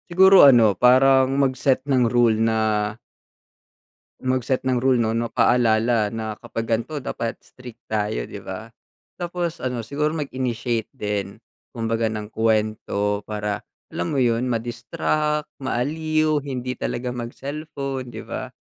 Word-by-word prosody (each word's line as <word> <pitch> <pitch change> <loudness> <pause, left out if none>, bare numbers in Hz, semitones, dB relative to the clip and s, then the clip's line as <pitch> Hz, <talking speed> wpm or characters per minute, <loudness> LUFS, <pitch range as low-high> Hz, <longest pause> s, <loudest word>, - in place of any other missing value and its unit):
Siguro 190 +2 +7
ano 115 -5 +6
parang 130 +3 +5
mag 135 -2 +2
set 130 0 +1
ng 130 -4 +2
rule 120 -2 +3
na 115 0 +2 1.6
mag 130 -1 0
set 130 +1 -1
ng 125 -2 +1
rule 130 -2 +3
'no 110 -1 +1
no 115 0 -2
paalala 115 -2 +3
na 110 -1 -4
kapag 115 - -4
gan'to 115 +7 -1
dapat 115 -3 -4
strict 125 -2 -13
tayo 105 - -2
di - - -8
ba? - - -7 0.5
Tapos 175 -1 -4
ano 125 -2 -2
siguro 150 +5 -1
mag-initiate 125 -6 -2
din, 105 -6 -4 0.3
kumbaga 115 -1 -1
ng 105 -1 -5
kuwento 110 -2 0
para 105 -1 -4 0.3
alam 85 - -3
mo - - +2
yun, 120 +1 +1
ma-distract, 125 +6 -1
ma-aliw, 155 +4 0
hindi 130 -2 -4
talaga 125 +1 -3
mag-cellphone 135 +1 -5
'di - - -7
ba? - - -5
125 Hz, 135 wpm, -23 LUFS, 115-135 Hz, 1.6 s, Siguro